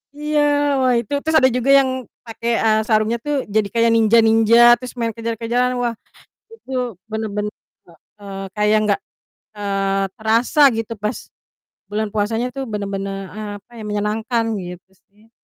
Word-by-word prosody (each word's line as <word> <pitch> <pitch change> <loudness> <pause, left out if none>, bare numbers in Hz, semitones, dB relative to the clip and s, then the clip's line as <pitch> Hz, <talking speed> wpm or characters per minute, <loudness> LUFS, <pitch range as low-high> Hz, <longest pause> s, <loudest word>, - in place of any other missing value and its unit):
Iya 300 0 -1 0.4
wah, 255 -1 +3
itu 235 - -8
terus 315 +2 -1
ada 260 - +4
juga 250 +2 -1
yang 265 - +1 0.4
pakai, 230 +1 -3
eee, 220 -1 +3
sarungnya 220 +1 +2
tuh 295 - 0 0.2
jadi 215 -2 +3
kayak 230 0 +3
ninja-ninja, 225 0 +4 0.2
terus 250 -1 -8
main 230 -1 0
kejar-kejaran. 230 +2 -1
Wah, 240 -1 0 0.6
itu 450 -12 -14 0.4
bener 220 0 -3
bener 210 0 -2 0.6
heeh, 200 -1 -9 0.2
kayak 210 0 +2
enggak, 210 -2 +1 0.6
eee, 195 -1 -1
terasa 230 +6 +1 0.2
gitu 225 0 -3
pas 210 +1 -3 0.7
bulan 215 +1 -2
puasanya 225 +3 0
tuh. 270 - -3
Bener-bener, 195 -1 -3 0.2
eee, 215 -1 -6
apa 205 - -38
ya, 220 - -8
menyenangkan 215 +3 -1
gitu 180 0 -9 0.2
sih. 215 +2 -25
220 Hz, 150 wpm, -20 LUFS, 210-235 Hz, 0.7 s, ada